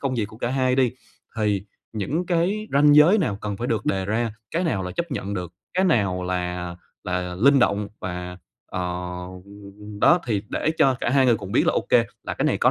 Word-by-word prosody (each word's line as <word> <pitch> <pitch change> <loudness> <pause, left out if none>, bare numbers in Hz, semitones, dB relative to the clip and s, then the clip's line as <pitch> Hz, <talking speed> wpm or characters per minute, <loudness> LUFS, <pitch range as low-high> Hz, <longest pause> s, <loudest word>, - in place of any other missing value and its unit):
công 135 -2 -1
việc 115 -4 0
của 110 +2 -11
cả 120 - -1
hai 130 -1 +1
đi, 130 -3 +3 0.4
thì 105 -3 +1 0.3
những 140 - -2
cái 185 +5 0
ranh 145 +1 +6
giới 165 +9 +7
nào 105 - -1
cần 105 -2 -4
phải 120 - -3
được 110 -3 -1
đề 95 -1 0
ra, 110 +2 -1 0.2
cái 170 +3 -1
nào 100 - 0
là 90 - -4
chấp 170 -2 -3
nhận 100 -6 -3
được, 90 -3 -5 0.2
cái 185 +1 +2
nào 100 - +1
là 90 -1 -3 0.3
là 90 -1 -2
linh 135 +8 +5
động 105 -4 +1
và, 90 0 -5 0.3
ờ, 90 - -4 1.2
đó, 175 0 +5
thì 105 -4 0
để 155 - 0
cho 135 -1 +5
cả 120 - 0
hai 135 -1 +4
người 120 -2 +4
cùng 100 -1 -8
biết - - +3
là - - +3
ô - - +1
kê, - - +5 0.2
là - - -3
cái - - -2
này - - +1
có - - +4
110 Hz, 220 wpm, -23 LUFS, 95-140 Hz, 1.2 s, giới